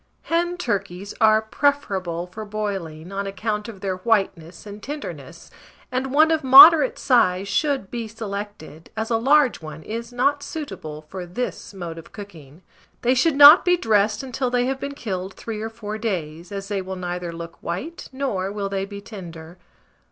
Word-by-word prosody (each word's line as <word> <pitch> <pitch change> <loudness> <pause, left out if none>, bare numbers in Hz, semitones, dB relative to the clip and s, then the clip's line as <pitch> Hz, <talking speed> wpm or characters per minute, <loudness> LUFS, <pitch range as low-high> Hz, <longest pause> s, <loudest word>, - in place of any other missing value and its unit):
Hen 345 +1 0
turkeys 200 - -3
are 220 0 +5
preferable 195 - -1
for 185 +5 -8
boiling, 195 -6 -5
on 195 0 -3
account 210 +2 -3
of 205 -5 -10
their 190 -2 -2
whiteness 185 -5 -1
and 205 0 -9
tenderness, 295 +1 -8 0.4
and 260 +1 -2
one 310 +3 +5
of 315 -2 +1
moderate 315 - +9
size 195 -7 +2
should 270 0 -1
be 235 -2 -4
selected, 205 -7 -7
as 220 +2 -3
a 225 - +3
large 270 +1 +3
one 155 0 -9
is 230 +4 -6
not 280 +4 +1
suitable 160 - -7
for 180 +3 -8
this 245 +8 -5
mode 170 -3 -6
of 165 - -14
cooking. 170 -6 -12 0.4
They 245 +1 +4
should 275 +4 +2
not 290 +4 +10
be 355 0 +3
dressed 215 -4 +1
until 255 0 -2
they 245 0 +1
have 265 +1 -2
been 280 +1 -5
killed 190 -6 -5
3 220 -2 -6
or 220 - -3
4 220 -1 -7
days, 170 -6 -4
as 195 -1 -5
they 200 -1 -2
will 190 0 -6
neither 180 -1 -4
look 170 0 -9
white, 250 - -6
nor 230 -9 -2
will 200 -1 -3
they 195 0 -2
be 200 0 -9
tender. 175 -5 -10
210 Hz, 175 wpm, -22 LUFS, 185-255 Hz, 0.4 s, not